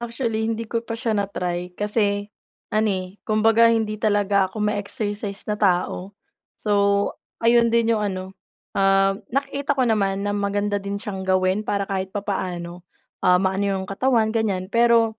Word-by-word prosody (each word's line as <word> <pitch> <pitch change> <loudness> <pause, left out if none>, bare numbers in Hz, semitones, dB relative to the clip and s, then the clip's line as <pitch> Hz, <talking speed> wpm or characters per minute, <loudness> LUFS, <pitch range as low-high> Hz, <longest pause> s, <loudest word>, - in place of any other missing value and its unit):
Actually 230 -2 -2
hindi 225 0 -2
ko 230 - +1
pa 230 - -3
siya 230 0 -2
na-try. 180 -4 -2
Kasi, 205 -1 0 0.5
ano, 215 +1 +2
eh, 185 0 -3
kumbaga 225 +2 +4
hindi 220 -2 +1
talaga 205 -2 +2
ako 210 +3 -5
ma-exercise 205 -1 -3
na 210 - -1
tao. 185 0 0 0.4
So, 210 - -5 0.7
ayon 235 0 +5
din 230 0 +2
yung 210 - -1
ano, 185 -1 -3 0.5
um, 195 0 +4
nakikita 280 +2 -1
ko 265 - +1
naman 200 -4 +1
na 205 - -1
maganda 205 0 0
din 200 +1 -5
siyang 190 -2 -5
gawin 185 +2 +1
para 200 -1 0
kahit 190 -1 -3
papaano, 180 -3 -4 0.4
ah, 180 0 +5
ma-ano 190 +1 0
iyong 190 0 -3
katawan 225 +1 +2
ganyan. 200 -4 -1
Pero, 230 -1 +3
205 Hz, 155 wpm, -23 LUFS, 195-225 Hz, 0.7 s, ayon